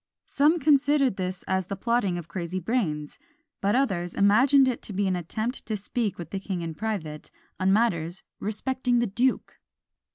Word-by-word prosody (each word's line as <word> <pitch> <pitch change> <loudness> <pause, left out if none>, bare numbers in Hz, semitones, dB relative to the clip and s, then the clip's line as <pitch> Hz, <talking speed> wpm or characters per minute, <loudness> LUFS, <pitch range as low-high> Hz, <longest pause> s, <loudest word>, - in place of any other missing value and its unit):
Some 300 +4 +3
considered 285 - +3
this 185 -1 -3
as 190 -1 -1
the 200 - -3
plotting 205 -3 0
of 170 -2 -7
crazy 175 +1 -4
brains, 165 - -2 0.4
but 200 +3 +2
others 185 -10 0
imagined 260 +7 +5
it 255 - -1
to 205 - -7
be 200 +1 0
an 190 -1 +1
attempt 215 +8 -3
to 215 -2 -1
speak 210 +1 -2
with 170 -3 -8
the 195 - -2
king 190 -2 -4
in 165 -1 -4
private, 160 -6 -4 0.3
on 190 +1 +3
matters 185 -5 +1 0.2
respecting 245 +4 -1
the 240 - +2
duke. 240 +5 -1
200 Hz, 170 wpm, -26 LUFS, 180-245 Hz, 0.4 s, imagined